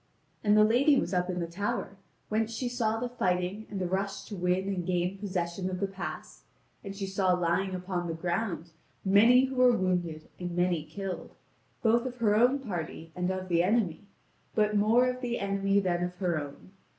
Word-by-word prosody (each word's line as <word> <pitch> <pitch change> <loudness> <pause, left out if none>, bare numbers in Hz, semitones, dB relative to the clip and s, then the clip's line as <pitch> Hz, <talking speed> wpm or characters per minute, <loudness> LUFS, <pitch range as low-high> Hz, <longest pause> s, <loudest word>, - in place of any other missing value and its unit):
And 210 0 +4
the 215 - +7
lady 260 +6 +4
was 175 - -3
up 180 0 +1
in 180 -1 -2
the 170 - -1
tower, 200 +4 -3 0.3
whence 220 +1 0
she 245 +2 -3
saw 230 -3 0
the 245 - -2
fighting 185 -3 -1
and 200 - -4
the 185 - -1
rush 195 +2 -2
to 210 - -7
win 180 +1 0
and 190 -3 -1
gain 180 +2 -1
possession 185 -2 -2
of 185 -1 -4
the 200 - +1
pass, 195 0 -7 0.4
and 195 -2 -6
she 200 0 -3
saw 190 -1 +1
lying 180 +2 0
upon 180 -1 -3
the 165 - -3
ground 175 -1 -2 0.3
many 230 +7 +6
who 265 0 -5
were 250 -1 +5
wounded 175 -4 -1
and 175 -1 -4
many 175 -3 +1
killed, 195 +3 -6 0.5
both 235 +2 +3
of 250 -1 -7
her 215 -3 +3
own 245 +5 +4
party 170 - -6
and 180 0 -1
of 185 0 -3
the 170 -2 +3
enemy, 200 -1 0 0.5
but 210 -1 +2
more 225 +5 +4
of 250 0 -2
the 240 -2 -1
enemy 195 0 +1
than 175 -2 0
of 180 0 -6
her 180 -4 0
own. 145 +5 -10
195 Hz, 200 wpm, -29 LUFS, 180-220 Hz, 0.5 s, the